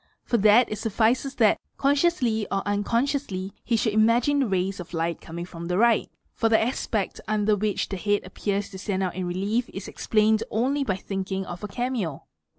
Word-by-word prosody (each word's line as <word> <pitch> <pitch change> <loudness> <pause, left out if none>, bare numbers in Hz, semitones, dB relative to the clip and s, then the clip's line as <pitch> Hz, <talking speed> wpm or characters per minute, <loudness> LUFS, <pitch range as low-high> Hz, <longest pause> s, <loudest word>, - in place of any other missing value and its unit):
For 235 - +1
that 215 +3 +6
1 215 - -4
suffices 230 +6 +1
that, 220 -4 +4 0.2
consciously 275 - +2
or 195 0 0
unconsciously, 205 -1 -1
he 235 - +1
should 220 0 0
imagine 230 +6 +3
the 270 - +2
rays 190 -1 -1
off 175 0 -8
light 165 +1 -1
coming 170 +1 -6
from 170 -1 -8
the 180 +1 0
right, 230 0 +3 0.2
for 225 - +1
the 220 - +5
aspect 220 -3 -2
under 215 0 +2
which 205 0 -1
the 195 - -4
head 205 +2 +1
appeat 200 +2 -2
to 190 - -8
stand 195 -1 -1
out 185 - -1
in 185 0 -3
relief 205 +7 -1
is 195 - -7
explained 215 0 +2
only 265 +6 +1
by 200 -8 0
thinking 195 0 -4
of 175 +3 -8
a - - -2
cameo. 220 - -3
210 Hz, 190 wpm, -25 LUFS, 190-235 Hz, 0.2 s, that